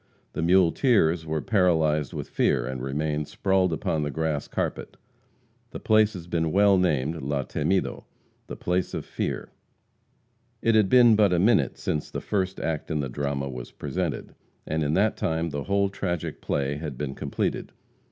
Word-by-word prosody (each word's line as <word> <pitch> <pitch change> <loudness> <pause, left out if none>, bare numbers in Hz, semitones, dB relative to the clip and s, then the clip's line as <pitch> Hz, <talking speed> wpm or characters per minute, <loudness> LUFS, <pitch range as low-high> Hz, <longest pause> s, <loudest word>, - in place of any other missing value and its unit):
The - - -3
muleteers 85 - +3
were 80 0 -2
paralyzed 80 - +2
with - - -5
fear, - - +1
and 65 -1 -4
remained 75 +3 -2
sprawled 95 -2 +1
upon 80 -1 -1
the 75 - -1
grass 80 -1 -2
carpet. - - -4 0.7
The - - -7
place 110 0 +3
has 90 -4 -8
been 80 -2 -1
well 100 0 +5
named 80 -2 0
La 70 0 -1
Temido 95 +7 -1 0.4
(the - - -6
place 90 +1 -1
of - - -4
fear.) - - -4 1.1
It 115 - +2
had 105 -3 +4
been 120 -3 +7
but 105 -3 +4
a 90 - +3
minute 90 - +3
since 75 - -3
the - - -4
first 95 -2 -2
act 80 -2 -3
in 80 - -1
the 70 -2 -2
drama 70 +1 -2
was 60 -2 -7
presented, - - -4 0.3
and 80 +1 -1
in 75 +2 0
that 105 +3 +2
time 80 0 -1
the 70 -1 -4
whole 100 0 +2
tragic 90 -4 -4
play 70 0 -1
had 75 -4 -6
been 70 -1 -3
completed. - - -3
80 Hz, 170 wpm, -26 LUFS, 75-95 Hz, 1.1 s, been